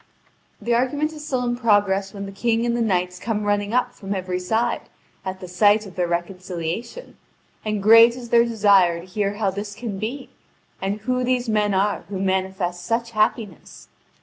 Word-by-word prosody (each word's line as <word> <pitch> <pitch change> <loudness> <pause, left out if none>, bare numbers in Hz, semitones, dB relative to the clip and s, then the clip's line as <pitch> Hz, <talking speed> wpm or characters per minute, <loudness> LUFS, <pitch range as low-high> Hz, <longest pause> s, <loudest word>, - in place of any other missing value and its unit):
The 235 +3 -1
argument 285 +6 0
is 300 -1 -9
still 255 -3 -1
in 240 0 0
progress 205 -4 +2
when 200 0 -6
the 195 - -7
King 230 +3 0
and 235 0 0
the 240 - 0
knights 180 -4 0
come 215 0 -2
running 205 0 0
up 250 0 +1
from 200 -3 -5
every 185 -1 -3
side, 220 +6 -1 0.3
at 190 0 -5
the 180 - -7
sight 205 +4 +3
of 195 - -11
their 180 -1 -1
reconciliation; 180 - -4 0.5
and 215 -2 -2
great 230 +2 +8
is 245 -2 -9
their 235 0 +5
desire 200 -7 +3
to 170 - -11
hear 200 +2 -2
how 205 -2 0
this 205 +1 -6
can 220 -4 -5
be, 250 +6 -5 0.5
and 200 +2 -2
who 255 +3 -1
these 250 -1 0
men 210 -2 +1
are 200 +2 0
who 195 -2 -4
manifest 190 -2 -1
such 230 +4 -1
happiness. 215 - -2
205 Hz, 185 wpm, -22 LUFS, 190-235 Hz, 0.5 s, great